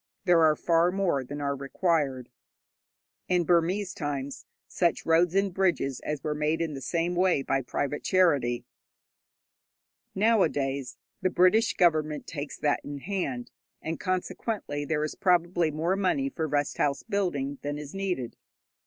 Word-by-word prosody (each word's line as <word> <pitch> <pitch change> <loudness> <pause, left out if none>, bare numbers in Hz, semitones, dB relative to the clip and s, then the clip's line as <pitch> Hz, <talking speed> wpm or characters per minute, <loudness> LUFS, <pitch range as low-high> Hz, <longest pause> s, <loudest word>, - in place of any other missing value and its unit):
There 175 -3 +5
are 155 -1 +5
far 165 +2 +3
more 180 -8 0
than 145 +3 -6
are 140 0 -1
required. 140 -2 -1 1.0
In 180 -1 +2
Burmese 180 +3 +1
times 140 -3 -4 0.2
such 170 -2 0
roads 165 +2 +3
and 195 -1 +2
bridges 170 -9 0
as 150 -2 -4
were 150 - -1
made - - -6
were - - -8 0.2
made - - -5
in 165 -2 -2
the 135 - -6
same 170 +6 -1
way 180 -5 +2
by 135 0 0
private 145 +3 -3
charity. 145 -10 +2 1.5
Nowadays, 145 - +1 0.2
the 185 - +2
British 185 +5 +3
Government 155 -4 +2
takes 145 -2 -6
that 145 -1 +1
in 145 0 -6
hand, 140 -7 -3 0.3
and 160 +1 -4
consequently 185 -4 -3
there 150 0 0
is 155 - -2
probably 175 -2 +2
more 160 +5 0
money 200 +9 +1
for 160 - -3
rest 145 -1 -1
house 140 -1 +1
building 145 -9 -2
than 145 0 -3
is 150 -1 -8
needed. 185 -11 -3
160 Hz, 155 wpm, -28 LUFS, 145-180 Hz, 1.5 s, There